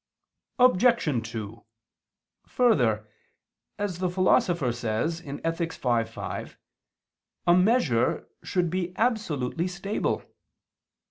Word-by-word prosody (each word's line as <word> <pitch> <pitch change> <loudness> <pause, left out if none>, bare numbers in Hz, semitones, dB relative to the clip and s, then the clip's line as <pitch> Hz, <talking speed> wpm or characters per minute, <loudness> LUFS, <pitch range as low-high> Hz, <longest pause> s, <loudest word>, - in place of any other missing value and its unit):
Obj. 215 - +3
2: 110 0 -7 0.8
Further, 120 - +2 0.7
as 200 -4 -3
the 185 -1 0
Philosopher 175 -6 +2
says 120 +8 -2
(Ethic. 165 +3 -3
v, 120 -4 +1
5), - - -7 0.9
a 175 - +6
measure 180 - +2
should 170 +1 -1
be 180 0 -3
absolutely 175 - 0
stable. 195 +3 -2
170 Hz, 85 wpm, -26 LUFS, 125-185 Hz, 0.9 s, a